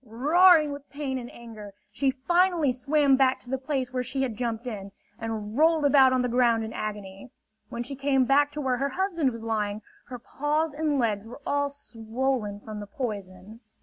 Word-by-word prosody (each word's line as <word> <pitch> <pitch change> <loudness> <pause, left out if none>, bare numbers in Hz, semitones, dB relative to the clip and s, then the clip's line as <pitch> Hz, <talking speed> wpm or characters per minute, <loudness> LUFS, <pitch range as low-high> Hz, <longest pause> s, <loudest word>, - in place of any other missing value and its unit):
Roaring 305 +7 +4
with 285 0 -9
pain 275 -2 -4
and 240 -1 -9
anger, 215 -4 -11 0.2
she 275 - 0
finally 335 +3 +2
swam 275 +2 +2
back 265 -1 +3
to 245 - -11
the 265 - 0
place 265 -2 -3
where 255 - 0
she 265 +2 -2
had 245 -4 -3
jumped 230 0 -3
in, 200 -5 -6 0.3
and 220 -2 -5
rolled 315 +1 +3
about 275 -2 +6
on 255 -1 +1
the - - +1
ground 235 -2 +2
in 220 - -6
agony. 205 +1 -6 0.4
When 235 - -4
she 275 - -6
came 270 -1 +2
back 285 +2 +4
to 300 - -4
where 260 -2 0
her 275 +2 -1
husband 340 -3 0
was 230 -2 -8
lying, 215 -2 -2 0.2
her 250 0 -8
paws 295 +5 -2
and 300 -1 0
legs 220 -4 -1
were 245 +5 -10
all 285 0 0
swollen 230 -4 -3
from 215 -1 -8
the 205 - -7
poison. 200 -2 -6
255 Hz, 195 wpm, -26 LUFS, 225-285 Hz, 0.4 s, about